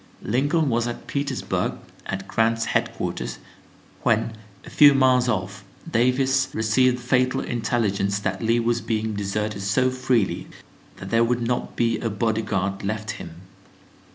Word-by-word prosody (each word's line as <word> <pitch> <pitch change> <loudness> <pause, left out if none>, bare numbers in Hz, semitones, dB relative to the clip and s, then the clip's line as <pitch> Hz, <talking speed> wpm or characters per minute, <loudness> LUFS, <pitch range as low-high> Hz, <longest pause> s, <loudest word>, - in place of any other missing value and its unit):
Lincoln 145 - +1
was 120 -1 +1
at 120 - -6
Petersburg 140 -2 -2 0.3
at 95 0 -4
Grant's 115 +1 +1
headquarters - - -2 0.6
when, 115 - +1 0.3
a - - -9
few 145 -2 +7
miles 130 -2 +4
off, 95 -2 -2 0.2
Davis 130 0 +2
received 120 +3 +3
the - - -11
fatal 130 +1 +1
intelligence 105 -4 0
that 100 - -3
Lee 115 +1 +2
was 120 0 0
being 110 0 -2
deserted 105 0 -2
so 130 +6 +2
freely 130 -5 0 0.5
that - - -8
there 115 0 +4
would 120 0 0
not 125 +1 -2
be 115 -1 +1
a 115 - -2
body 110 +1 0
guard 100 -2 -2
left 110 +2 -3
him. 85 +1 -9
115 Hz, 145 wpm, -24 LUFS, 105-125 Hz, 0.6 s, few